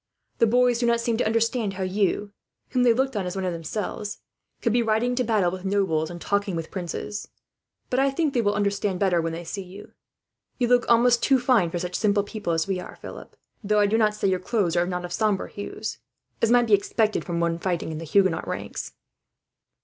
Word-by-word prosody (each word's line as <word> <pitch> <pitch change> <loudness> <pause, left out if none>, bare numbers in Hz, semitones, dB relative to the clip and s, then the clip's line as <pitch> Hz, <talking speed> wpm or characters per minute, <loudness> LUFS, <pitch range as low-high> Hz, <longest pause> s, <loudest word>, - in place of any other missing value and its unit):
The 230 - +5
boys 245 +1 +3
did 240 - +1
not 235 0 +3
seem 235 -1 0
to - - +1
understand 230 -1 +1
how 190 0 -4
you, 200 +1 0 0.4
whom 255 - +1
they 245 -1 +5
looked 265 +2 0
on 195 -3 -1
as 180 - -4
one 190 -1 -2
of 180 - -1
themselves, 205 +5 -4 0.5
could 230 - +2
be 240 - +3
riding 225 +2 +1
to 250 0 +1
battle 215 -6 +2
with 185 0 -7
nobles 190 -6 0
and 175 0 -7
talking 200 0 -1
with 165 -1 -5
princes; 190 +3 -5 0.6
but 255 - +2
I 275 +1 +4
think 285 +1 0
they 245 - +2
will 205 -2 +1
understand 200 -2 0
better, 185 -4 +2
when 165 0 -2
they 165 +1 -6
see 195 +4 -5
you. 190 +2 -11 0.7
You 245 -2 +1
look 245 -1 +3
almost 235 0 +5
too 270 - +4
fine 240 -8 +3
for 175 - -3
such 180 +1 -4
simple 205 -2 +2
people 205 -3 -4
as 165 0 +1
we 190 -2 -1
are, - - -9
Philip; - - -10 0.3
though 210 +1 +2
I 205 - +5
do 205 +2 +1
not 215 -2 +3
say 205 - 0
your 185 -1 +1
clothes 185 -3 0
are 175 0 +2
not 180 -1 -3
of 175 - -6
sombre 210 0 0
hues, 205 - -6 0.4
as 230 - +3
might 240 0 +5
be 220 - +1
expected 215 +2 +2
from 170 -1 -3
one 170 0 0
fighting 175 -2 -2
in 155 - -5
the - - -6
Huguenot 185 0 +2
ranks." - - -5
205 Hz, 225 wpm, -25 LUFS, 180-230 Hz, 0.7 s, The